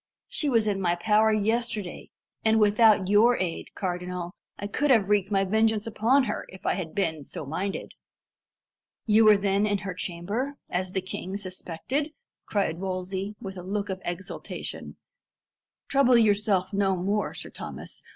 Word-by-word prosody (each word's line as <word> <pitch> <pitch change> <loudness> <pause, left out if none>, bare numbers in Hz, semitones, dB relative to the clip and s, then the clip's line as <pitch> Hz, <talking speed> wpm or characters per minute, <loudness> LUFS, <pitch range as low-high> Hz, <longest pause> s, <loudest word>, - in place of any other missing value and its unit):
She 295 - -1
was 230 -4 +3
in 200 -2 0
my 175 -2 +2
power 215 +4 +3
yesterday, 215 -2 -1 0.3
and 220 0 +4
without 210 -2 +5
your 220 +5 +5
aid, 175 -3 -4
cardinal, 180 -1 -4 0.2
I 200 - -5
could 290 +8 0
have 220 -7 +4
wreaked 205 -2 +2
my 195 -1 +2
vengeance 220 +1 +2
upon 230 +5 +3
her, 210 -4 -3
if 190 - -13
I - - +2
had 175 -3 -5
been 160 -7 -1
so 145 - -7
minded." 185 +7 -3 1.1
"You 220 0 +5
were 210 -1 +8
then 200 +1 +1
in 205 -1 +1
her 195 -1 -5
chamber, 200 +11 -3 0.2
as 185 +1 -2
the 190 - 0
king 185 +1 -5
suspected?" 205 - -4 0.3
cried 185 -5 0
Wolsey, 190 +2 -3
with 190 -1 -7
a - - -5
look 200 +3 -3
of 190 0 -4
exultation. 175 +2 -6 0.9
"Trouble 270 -3 +5
yourself 205 -3 +2
no 195 -1 +2
more, 200 +4 -1
Sir - - -6
Thomas. - - -7
200 Hz, 160 wpm, -27 LUFS, 185-220 Hz, 1.1 s, were